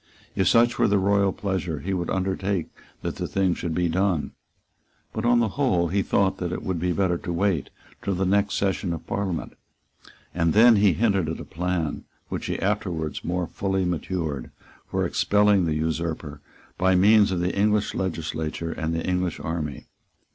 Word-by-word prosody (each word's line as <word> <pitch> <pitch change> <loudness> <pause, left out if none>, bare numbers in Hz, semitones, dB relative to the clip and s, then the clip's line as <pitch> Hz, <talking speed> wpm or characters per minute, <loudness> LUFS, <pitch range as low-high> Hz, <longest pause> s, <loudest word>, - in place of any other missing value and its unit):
If 95 - +2
such 120 +1 +4
were 120 - +4
the 100 - +3
royal 100 0 +3
pleasure, 95 -6 -3
he 95 +2 -2
would 85 -2 -2
undertake 95 -1 -1 0.3
that - - -3
the - - -3
thing 95 -2 +1
should 85 -2 -4
be 90 0 +1
done. 85 -4 0 0.8
But 110 +1 -3
on 120 0 +4
the 110 - +1
whole 95 - +1
he 100 +3 +1
thought 95 0 +1
that 90 -1 -2
it - - -4
would 95 -3 -2
be 90 +2 0
better 90 -1 +1
to 90 - -5
wait 85 -4 0 0.3
till 100 - -1
the 95 +2 0
next 100 +2 +2
session 95 -2 0
of 80 - -7
Parliament. 95 -4 -3 0.8
And 85 -2 +1
then 115 +1 +7
he 100 -3 +4
hinted 100 -7 +1
at 80 - -4
a - - -6
plan 85 -2 -2 0.2
which - - -4
he - - -1
afterwards 90 -6 -2
more 90 +1 -1
fully 95 +1 -1
matured, 80 -6 -3 0.4
for - - 0
expelling 105 -2 +3
the 80 -2 0
usurper 80 -2 -3 0.4
by 95 +1 +4
means 105 +2 +5
of 90 - 0
the 90 +1 -1
English 105 +1 +2
legislature 80 -2 -3
and 80 0 -2
the 80 - -2
English 90 -1 -1
army. 80 -4 -4
90 Hz, 180 wpm, -25 LUFS, 85-100 Hz, 0.8 s, then